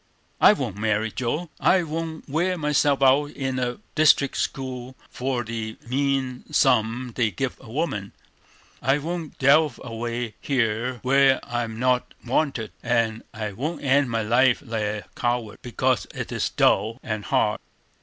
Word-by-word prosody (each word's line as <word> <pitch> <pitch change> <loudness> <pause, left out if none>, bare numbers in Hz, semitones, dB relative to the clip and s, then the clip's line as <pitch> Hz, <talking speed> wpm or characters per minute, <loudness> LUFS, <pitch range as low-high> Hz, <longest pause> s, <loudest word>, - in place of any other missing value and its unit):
"I - - +8
won't 120 - -4
marry 110 +1 0
Joe; 150 +9 -3
I 180 -1 +4
won't 160 0 -5
wear 175 +5 0
myself 145 -2 +2
out 135 +2 +5
in 135 -3 -3
a 125 -1 -2 0.2
district 150 -3 +4
school 130 -1 -4 0.2
for 125 -1 -2
the 110 -1 -5
mean 135 -1 -1
sum 120 +2 +2
they 115 -2 +1
give 135 +3 -3
a - - -14
woman; 110 -8 -2 0.7
I 135 +3 +3
won't 165 +1 -5
delve 140 0 +4
away 120 -1 -4
here 125 -1 0
where 135 0 +4
I'm 115 -2 -3
not 125 +1 0
wanted; 125 -3 0
and 115 -2 0
I 110 -2 -4
won't 150 - -4
end 140 -1 +3
my 115 -1 0
life 120 +4 +3
like 115 -2 -2
a 105 0 -3
coward, 120 -3 -2
because 130 0 0
it - - -5
is - - -1
dull 110 +4 +2
and 110 -3 -4
hard. - - +1
125 Hz, 150 wpm, -24 LUFS, 115-140 Hz, 0.7 s, I